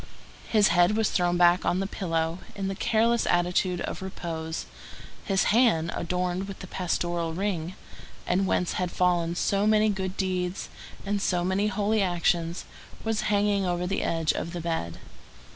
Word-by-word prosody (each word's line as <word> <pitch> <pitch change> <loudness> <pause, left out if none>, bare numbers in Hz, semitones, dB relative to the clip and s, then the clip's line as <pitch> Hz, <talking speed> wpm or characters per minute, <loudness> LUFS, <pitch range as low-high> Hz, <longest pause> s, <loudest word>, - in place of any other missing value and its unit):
His 210 -2 +4
head 175 +4 +4
was 220 -2 +1
thrown 175 -1 +1
back 175 +1 +5
on 180 - +1
the 195 - -1
pillow, 165 -3 -2 0.2
in 195 -1 -2
the - - -2
careless 230 +4 +1
attitude 175 0 +1
of - - -4
repose; 165 -4 -5 0.6
his 195 -2 +2
hand, 190 -9 +3
adorned 180 +2 -2
with 195 - -7
the - - -8
pastoral 175 -2 -2
ring, 185 -2 -2 0.5
and 190 +2 +1
whence 180 - 0
had 180 - 0
fallen 175 -2 +1
so 200 +3 +1
many 215 0 +4
good 190 -2 -3
deeds 185 -1 -2 0.4
and 200 0 -1
so 180 -3 +1
many 190 +3 +1
holy 210 +1 +1
actions, 175 -2 0 0.4
was 225 -2 -1
hanging 205 -1 +2
over 175 0 -1
the 195 - -1
edge 165 -1 +1
of 170 - -4
the 175 - -4
bed. 160 - -3
180 Hz, 160 wpm, -27 LUFS, 175-200 Hz, 0.6 s, back